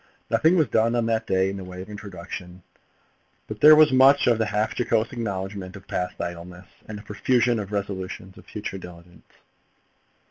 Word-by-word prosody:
Nothing 160 Hz, +3 st, +4 dB
was 155 Hz, -5 st, +3 dB
done 115 Hz, +2 st, +1 dB
on 120 Hz, -1 st, +1 dB
that 115 Hz, -1 st, -1 dB
day 95 Hz, 0 st, +1 dB
in 100 Hz, -, -6 dB
the 95 Hz, -, -7 dB
way 90 Hz, 0 st, -9 dB
of 95 Hz, -, -8 dB
instruction; 90 Hz, -3 st, -9 dB, 0.8 s
but 110 Hz, -1 st, -8 dB
there 155 Hz, +1 st, +9 dB
was 155 Hz, -1 st, +6 dB
much 135 Hz, +2 st, +5 dB
of 120 Hz, -2 st, +3 dB
half 105 Hz, 0 st, 0 dB
jocose 115 Hz, -2 st, 0 dB
acknowledgement 100 Hz, -4 st, -5 dB
of 95 Hz, -, -13 dB
past 90 Hz, 0 st, -4 dB
idleness, 90 Hz, +2 st, -7 dB, 0.2 s
and 110 Hz, -, -7 dB
a 105 Hz, -, -11 dB
profusion 120 Hz, +2 st, +1 dB
of 100 Hz, -1 st, -6 dB
resolutions 95 Hz, -2 st, -5 dB
of -, -, -16 dB
future 105 Hz, -2 st, -6 dB
diligence. 90 Hz, -1 st, -14 dB
105 Hz, 175 wpm, -24 LUFS, 95-115 Hz, 0.8 s, there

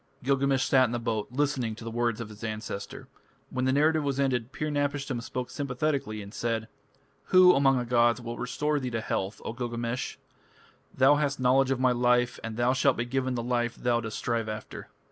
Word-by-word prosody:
Gilgamesh 135 Hz, 0 st, +2 dB
sat 130 Hz, -1 st, +5 dB
in 120 Hz, -, -3 dB
the -, -, 0 dB
boat 115 Hz, -2 st, -2 dB
listening 130 Hz, -4 st, -1 dB
to 115 Hz, -, -11 dB
the 115 Hz, -, -5 dB
words 120 Hz, -1 st, 0 dB
of 115 Hz, -2 st, -6 dB
his 105 Hz, 0 st, -12 dB
ancestor. 110 Hz, -2 st, -5 dB, 0.4 s
When 130 Hz, 0 st, -1 dB
the 130 Hz, -, +3 dB
narrative 155 Hz, +3 st, +3 dB
was 140 Hz, -1 st, -1 dB
ended, 130 Hz, -3 st, 0 dB
Pir 150 Hz, +2 st, -3 dB
napishtim 145 Hz, -3 st, -1 dB
spoke 125 Hz, +1 st, -5 dB
sympathetically 135 Hz, -5 st, -2 dB
and 100 Hz, +1 st, -11 dB
said: 115 Hz, -1 st, -2 dB, 0.6 s
"Who 185 Hz, -1 st, +7 dB
among 135 Hz, -1 st, +4 dB
the 125 Hz, -, -1 dB
gods 120 Hz, 0 st, +3 dB
will 120 Hz, -1 st, -6 dB
restore 145 Hz, +5 st, -1 dB
thee 130 Hz, -2 st, -3 dB
to 115 Hz, -2 st, -2 dB
health, 100 Hz, -1 st, -3 dB
O -, -, -3 dB
Gilgamesh? 120 Hz, 0 st, -3 dB, 0.7 s
Thou 135 Hz, +3 st, +4 dB
hast 145 Hz, -2 st, -1 dB
knowledge 130 Hz, +1 st, +3 dB
of 135 Hz, -1 st, 0 dB
my 130 Hz, -1 st, +3 dB
life, 125 Hz, 0 st, +2 dB
and 115 Hz, 0 st, -5 dB
thou 120 Hz, +1 st, +2 dB
shalt 135 Hz, 0 st, +2 dB
be 120 Hz, -, -1 dB
given 130 Hz, +1 st, -1 dB
the 120 Hz, -, -2 dB
life 120 Hz, -1 st, -1 dB
thou 120 Hz, -1 st, +1 dB
dost 115 Hz, -2 st, -5 dB
strive 115 Hz, -2 st, -1 dB
after. 110 Hz, 0 st, -7 dB
125 Hz, 200 wpm, -28 LUFS, 115-135 Hz, 0.7 s, Who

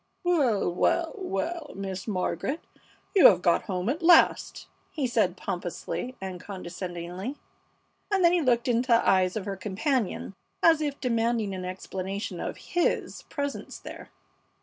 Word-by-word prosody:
"Well, 260 Hz, -, +2 dB
well, 330 Hz, -, +1 dB
well, 345 Hz, -, -3 dB
Miss 190 Hz, 0 st, -5 dB
Margaret, 205 Hz, -, -1 dB, 0.6 s
you 380 Hz, -, +10 dB
have 180 Hz, -3 st, +4 dB
got 170 Hz, -, +3 dB
home 185 Hz, 0 st, -2 dB
at 295 Hz, +8 st, -1 dB
last!" 340 Hz, 0 st, +4 dB, 0.2 s
he 295 Hz, -4 st, -2 dB
said, 215 Hz, -7 st, +1 dB
pompously 180 Hz, +9 st, -4 dB
and 185 Hz, -2 st, -6 dB
condescendingly, 180 Hz, +3 st, -6 dB, 0.7 s
and 395 Hz, -3 st, +2 dB
then 340 Hz, -, +6 dB
he 355 Hz, -, +3 dB
looked 245 Hz, -4 st, +2 dB
into 245 Hz, +1 st, +1 dB
the 230 Hz, -, +3 dB
eyes 185 Hz, -1 st, +3 dB
of 210 Hz, -3 st, -3 dB
her 200 Hz, -, -3 dB
companion 210 Hz, -, -1 dB, 0.3 s
as 325 Hz, -2 st, +6 dB
if 290 Hz, -2 st, -2 dB
demanding 230 Hz, -4 st, 0 dB
an 185 Hz, -1 st, -5 dB
explanation 190 Hz, +2 st, -5 dB
of -, -, -4 dB
his 350 Hz, 0 st, -1 dB
presence 285 Hz, -1 st, -4 dB
there. -, -, -10 dB
215 Hz, 145 wpm, -27 LUFS, 185-285 Hz, 0.7 s, you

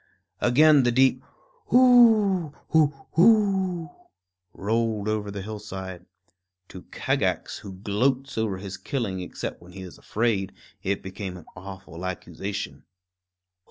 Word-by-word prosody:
Again 145 Hz, +4 st, +5 dB
the 120 Hz, -1 st, +2 dB
deep 130 Hz, +1 st, +3 dB, 0.5 s
Whooo 220 Hz, -, +5 dB
hoo 155 Hz, -3 st, +4 dB, 0.2 s
hoo! 190 Hz, -3 st, +3 dB, 0.6 s
rolled 110 Hz, +1 st, -1 dB
over 105 Hz, -1 st, -1 dB
the 100 Hz, -1 st, -6 dB
hillside. 95 Hz, -4 st, -7 dB, 0.6 s
To 90 Hz, -, -10 dB
Kagax, -, -, -1 dB
who 100 Hz, -2 st, -9 dB
gloats 125 Hz, +7 st, -1 dB
over 110 Hz, -4 st, -1 dB
his 95 Hz, 0 st, -7 dB
killing 115 Hz, -10 st, -3 dB
except 90 Hz, -, -6 dB
when 90 Hz, +1 st, -15 dB
he 95 Hz, -, -8 dB
is 90 Hz, -, -11 dB
afraid, 105 Hz, -4 st, -1 dB, 0.3 s
it 100 Hz, +1 st, -2 dB
became 95 Hz, -1 st, -6 dB
an 85 Hz, -, -13 dB
awful 95 Hz, -2 st, -9 dB
accusation. 95 Hz, +2 st, -5 dB
110 Hz, 120 wpm, -25 LUFS, 95-145 Hz, 0.6 s, Again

